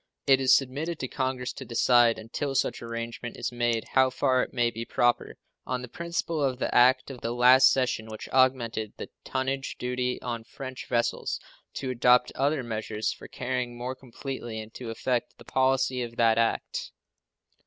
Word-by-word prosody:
It 135 -1 +5
is 130 -1 +6
submitted 145 +5 -1
to 130 - -3
Congress 130 -1 -2
to - - -8
decide, 120 0 +4
until 135 +5 -4
such - - 0
arrangement 115 0 -5
is - - -3
made, 120 -2 -1
how 130 0 +4
far 130 0 +2
it - - -3
may 120 -1 +1
be 115 0 -5
proper, 120 +1 +1 0.3
on 125 0 -3
the - - -6
principle 170 +1 -2
of 130 -2 0
the - - -2
act 130 +2 +5
of 125 - -10
the 115 - -2
last 125 +2 +7
session 125 -4 0
which 110 -1 -8
augmented 120 -5 +2
the - - -7
tonnage 135 +1 -2
duty 125 0 -2
on 120 -2 -3
French 130 +2 -8
vessels, 120 -1 0 0.4
to 130 -2 -3
adopt 125 0 +4
other 140 0 0
measures 110 -1 -2
for - - -12
carrying 125 -1 -3
more 125 +2 -3
completely 130 -3 -7
into 110 +2 -8
effect 120 +2 -2
the - - -15
policy 130 -1 +1
of 120 -1 -5
that 115 -1 +4
act. 115 - -1
125 Hz, 175 wpm, -27 LUFS, 115-130 Hz, 0.4 s, last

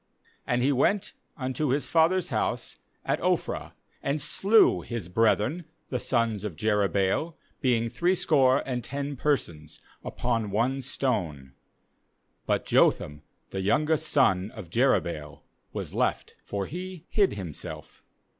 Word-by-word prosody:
5And 120 0 +1
he 140 - +3
went 165 +9 +1 0.2
unto 130 +2 -2
his 140 +3 0
father's 170 +3 +3
house - - -2 0.3
at - - 0
Oph - - +1
rah, - - -5 0.3
and 140 +2 -1
slew 200 +9 +4
his 115 -7 -5
brethren 115 - +1 0.3
the 125 - -1
sons 115 -5 0
of 105 -6 -4
Jerubbaal, 105 - +1 0.3
being 120 -4 +2
threescore 145 -4 +3
and 125 -3 -3
ten 140 +3 -4
persons, 85 - -2 0.2
upon 115 -3 -1
one 120 +7 0
stone; 85 - -2 0.9
but - - +1
Jotham 75 0 +2 0.3
the 95 - -3
youngest 155 +9 +1
son 95 -9 +3
of 90 -7 -9
Jerubbaal 85 - 0 0.3
was - - -5
left; - - -1
for 100 -1 -3
he 180 - -7
hid 200 -3 +2
himself. 90 -7 -8
125 Hz, 125 wpm, -27 LUFS, 100-150 Hz, 0.9 s, slew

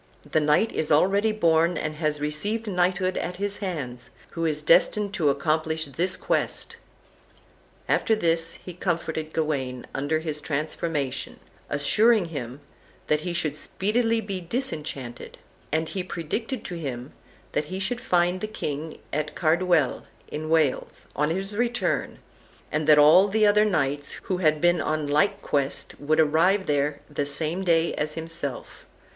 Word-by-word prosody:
The - - +4
knight 150 +9 +3
is 155 - -2
already 200 +8 +4
born, 170 -4 +2
and 155 - -2
has 155 -2 0
received 205 +10 -2
knighthood 185 -1 +1
at 180 - -3
his 200 +2 -2
hands, 140 - -5 0.2
who 165 -1 -2
is 150 -1 -2
destined 195 +5 +4
to 165 -7 +2
accomplish 160 +3 0
this 170 +6 -2
quest." - - -1 1.1
And - - +3
after 220 - +2
this 165 -4 +1
he 180 - -7
comforted 165 -3 -2
Gawain 135 -6 -2
under 145 +3 0
his 155 -2 -4
transformation, 145 -2 -3 0.3
assuring 190 +8 +3
him 135 -3 -6 0.4
that 150 0 +1
he 175 - -3
should 155 -4 -1
speedily 225 +7 0
be 195 -3 -4
disenchanted; 155 - -3 0.3
and 160 +1 0
he 190 +2 -3
predicted 215 - -4
to 175 -2 -5
him 130 -3 -5 0.4
that 150 - -1
he 185 +5 -5
should 235 +6 -2
find 180 -5 +1
the 215 - -2
king 155 -7 -5 0.2
at 150 +1 -2
Carduel, 170 -3 +2 0.2
in 155 +1 -5
Wales, 160 -4 +1
on 150 +1 +1
his 195 +4 -3
return, 235 -3 -1 0.5
and 155 0 -1
that 150 -1 +7
all 155 +7 +7
the 215 +2 +3
other 210 +1 +5
knights 145 -7 0
who 185 - -1
had 155 -4 +2
been 175 +1 +3
on 155 -1 -1
like 195 +8 +1
quest 140 -1 -2
would 155 +2 +1
arrive 165 +6 +3
there 145 0 0
the 145 - -2
same 160 +5 -2
day 170 -2 +2
as 150 0 -2
himself. 160 -5 -5
160 Hz, 150 wpm, -25 LUFS, 150-190 Hz, 1.1 s, that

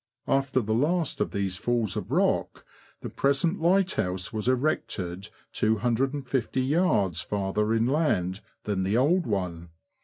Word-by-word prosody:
After 135 -1 +1
the 110 0 -1
last 160 +6 0
of - - +1
these 95 -2 -2
falls 115 -1 0
of - - -4
rock, - - 0 0.4
the - - -5
present 140 +6 +1
lighthouse 160 - +1
w^as 110 +1 -4
erected 100 - -1 0.2
250yds. 125 - +1
farther 105 +3 -1
inland 115 - +1 0.2
than 100 -3 -1
the 100 +4 +1
old 165 +7 +2
one. 90 -5 -3
115 Hz, 120 wpm, -27 LUFS, 95-140 Hz, 0.4 s, old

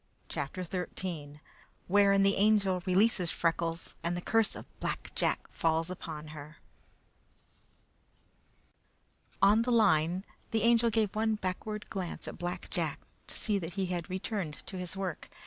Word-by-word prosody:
CHAPTER 145 +6 -3
XIII 170 -4 -5 0.4
Wherein 195 +1 +5
the 195 0 +4
Angel 200 -3 +3
Releases 185 -1 +3
Freckles, 165 0 -1
and 170 +1 -1
the - - -3
Curse 225 +3 +2
of - - -8
Black - - -3
Jack - - +1
Falls 165 +1 +1
upon 155 -4 -6
Her 150 +1 -9 2.9
On 205 +3 +7
the 240 - -1
line, 185 -4 +4 0.2
the 220 -2 +1
Angel 235 0 +5
gave 215 -2 +1
one 220 0 +2
backward 210 +2 -4
glance 185 -3 -4
at - - -7
Black 175 0 -4
Jack, - - -1 0.3
to - - -5
see 210 -3 +1
that 170 -1 -5
he 195 -1 0
had 175 -2 -3
returned 185 -4 -3
to 190 - -6
his 180 +1 -5
work. 190 -4 -4
185 Hz, 145 wpm, -31 LUFS, 170-210 Hz, 2.9 s, On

